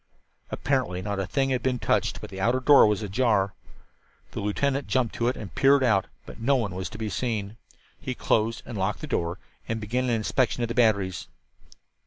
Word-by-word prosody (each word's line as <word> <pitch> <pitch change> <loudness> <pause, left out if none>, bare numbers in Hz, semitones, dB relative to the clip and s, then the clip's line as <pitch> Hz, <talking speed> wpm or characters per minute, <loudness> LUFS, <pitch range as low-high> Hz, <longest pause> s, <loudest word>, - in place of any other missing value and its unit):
Apparently 90 +1 -1
not 100 -1 -3
a 95 - -2
thing 135 -1 0
had 125 -2 0
been 125 0 0
touched, - - 0
but - - -9
the 95 0 -6
outer 120 +5 +2
door 140 -2 +7
was 105 +1 0
ajar. 100 -2 +1 0.8
The - - -5
lieutenant 135 +7 -1
jumped 130 -3 0
to 120 - -1
it 125 - 0
and 100 - -8
peered 140 0 +4
out, 100 -6 +2 0.2
but - - -11
no 140 +4 +3
one 110 -7 -1
was 95 0 -4
to - - -9
be 110 0 -3
seen. 105 -2 -3 0.4
He 130 -2 -4
closed 115 0 0
and 115 -5 -6
locked 95 +2 -1
the - - -4
door 85 +2 -2 0.3
and 115 0 -2
began 120 +4 -1
an - - -1
inspection 120 +2 0
of 120 - -2
the - - -2
batteries. 100 -7 +1
115 Hz, 205 wpm, -26 LUFS, 100-125 Hz, 0.8 s, door